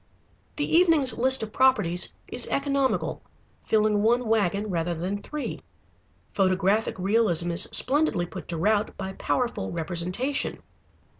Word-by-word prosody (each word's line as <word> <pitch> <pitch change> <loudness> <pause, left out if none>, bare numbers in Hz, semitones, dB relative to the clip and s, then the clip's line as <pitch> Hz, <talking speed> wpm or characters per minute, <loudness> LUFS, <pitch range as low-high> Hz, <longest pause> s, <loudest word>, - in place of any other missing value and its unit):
The 290 - -1
evening's 325 -6 +4
list 260 0 +3
of 215 - -7
properties 250 -10 +2 0.2
is - - +1
economical, 275 -1 -1 0.5
filling 215 -1 +2
one 240 +2 +2
wagon, 210 -1 0
rather 170 0 -1
than 190 +5 -4
three. 300 +4 -5 0.7
Photographic 195 +3 +1
realism 185 -3 +1
is 170 - +1
splendidly 265 - +2
put - - -9
to 170 - -4
rout 210 +5 0
by 190 -1 -5
powerful 245 +4 -2
representation. 180 - -3
210 Hz, 125 wpm, -25 LUFS, 180-260 Hz, 0.7 s, evening's